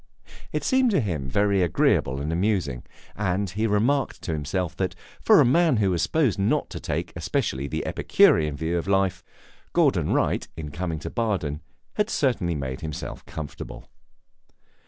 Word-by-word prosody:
It - - -2
seemed 260 -1 +3
to 200 - +3
him 80 - -2
very 100 +5 +2
agreeable 70 -5 +2
and 75 +3 -2
amusing, 90 - 0 0.3
and 95 -1 -1
he 110 +4 0
remarked 120 +7 +1
to 80 - -2
himself 80 +3 -2
that, - - -1 0.3
for - - +6
a - - +6
man 160 +1 +4
who 100 -3 +2
was 85 -2 0
supposed 135 - +1
not 100 - +1
to - - -5
take - - -3
especially 65 +2 -1
the - - -3
Epicurean 75 -2 +3
view 85 +3 -1
of 85 - -6
life, 95 -2 +1 0.5
Gordon - - +2
Wright, - - +1
in 75 -2 -6
coming 85 +1 -3
to - - -5
Baden, 95 -11 -1 0.4
had 210 0 +1
certainly 115 - 0
made 65 -2 -4
himself 75 -2 -6
comfortable. 75 -4 -8
90 Hz, 160 wpm, -25 LUFS, 75-105 Hz, 0.5 s, for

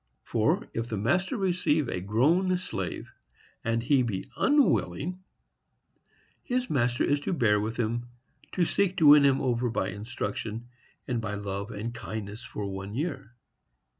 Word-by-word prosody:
For, - - +1
if 115 +1 -2
the 110 -3 -3
master 175 - +1
receive 175 - +1
a 90 - -3
grown 160 - +2
slave, 180 - -5 0.5
and 115 0 0
he 135 +1 +4
be 110 -6 -2
unwilling, 185 - +2 1.2
his 250 0 -2
master 120 -4 +1
is 145 - +2
to 145 - -2
bear 110 -9 +3
with 110 +2 -3
him, 120 +1 -1 0.5
to 180 - +2
seek 190 +1 +1
to 165 - +3
win 145 0 +9
him 135 -1 +4
over 125 -2 0
by 100 -4 -1
instruction, 110 +2 -5 0.4
and 120 -3 -1
by 105 -2 -3
love 100 0 -4
and 115 +2 -5
kindness, 110 -1 -6
for 110 -3 -5
one 95 +1 -5
year. 140 -5 -4
120 Hz, 150 wpm, -28 LUFS, 105-150 Hz, 1.2 s, win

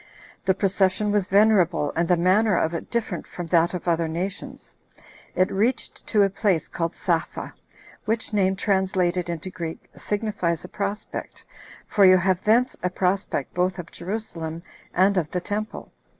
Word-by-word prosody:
The 190 - +3
procession 195 +1 +1
was 205 -3 +1
venerable, 190 -7 +3
and 170 +1 +1
the 180 - +3
manner 190 +3 +3
of 160 - +1
it 165 - -5
different 220 -7 -2
from 175 - -6
that 170 +1 +4
of 180 - -6
other 165 -1 +2
nations. 195 - -5 0.6
It 185 - +2
reached 225 +6 -1
to 210 -3 +4
a 195 - +3
place 195 -4 +1
called 165 0 -3
Sapha, 170 -4 -2 0.5
which 225 +1 -2
name, 190 -2 +2
translated 185 -3 0
into 170 +2 -4
Greek, 165 -3 -7
signifies 205 -6 -2
a - - -10
prospect, 205 +1 -5 0.4
for 205 - +2
you 185 -1 +8
have 185 0 +1
thence 240 +4 +3
a 180 - 0
prospect 180 -6 -1
both 180 +1 0
of 175 -2 -8
Jerusalem 170 -4 -5 0.3
and 195 +2 +3
of 160 -4 0
the 180 - -2
temple. 210 +3 -4
185 Hz, 160 wpm, -24 LUFS, 175-205 Hz, 0.6 s, you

